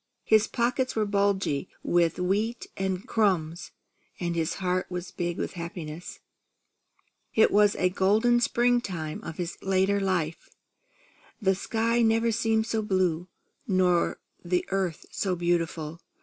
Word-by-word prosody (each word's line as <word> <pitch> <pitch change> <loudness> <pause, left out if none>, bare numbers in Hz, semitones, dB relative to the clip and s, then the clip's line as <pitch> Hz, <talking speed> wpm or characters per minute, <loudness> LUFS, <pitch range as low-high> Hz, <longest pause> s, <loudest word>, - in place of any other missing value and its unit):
His 220 -1 +4
pockets 250 +2 0
were 215 -1 +1
bulgy 200 -6 0
with 170 -2 +2
wheat 205 +6 -1
and 190 +3 -2
crumbs, 180 -8 0 0.5
and 170 -1 -2
his 165 0 -1
heart 185 -1 -1
was 180 0 -5
big 175 -1 -3
with - - -3
happiness. 170 -2 -7 1.1
It 220 - +5
was 205 0 +5
the 185 - +1
golden 220 +6 +3
springtime 235 -11 0
of 160 - -7
his 175 0 -4
later 195 +1 +2
life. 180 -5 -1 0.9
The 195 -4 +3
sky 230 +4 0
never 225 0 +3
had - - 0
seemed 220 0 +1
so 225 -1 -1
blue, 185 -4 0 0.4
or 180 -2 +2 0.2
the 180 0 0
earth 190 -4 -1
so 190 -2 -1
beautiful. 170 -2 -1
190 Hz, 135 wpm, -27 LUFS, 175-220 Hz, 1.1 s, It